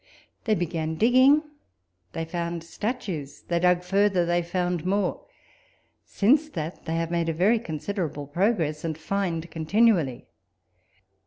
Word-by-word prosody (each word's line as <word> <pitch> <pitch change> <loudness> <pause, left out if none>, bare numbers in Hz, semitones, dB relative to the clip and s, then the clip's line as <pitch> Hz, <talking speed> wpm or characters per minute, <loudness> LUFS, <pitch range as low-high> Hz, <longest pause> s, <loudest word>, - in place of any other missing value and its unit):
They 220 -2 +3
began 165 -3 -2
digging, 255 - +5 0.7
they 165 - -3
found 170 0 -4
statues: 170 - -5
they 170 -1 +1
dug 180 0 +3
further, 195 -1 +2
they 175 +1 +1
found 175 -1 -2
more. 190 +1 -1 0.8
Since 285 +9 +2
that 165 - -6
they 165 -1 -2
have 165 0 -2
made 170 -1 0
a - - 0
very 200 +8 +3
considerable 160 -4 -4
progress, 165 -1 0
and 160 -2 -3
find 170 -1 -2
continually. 165 - +2
175 Hz, 130 wpm, -26 LUFS, 160-200 Hz, 0.8 s, digging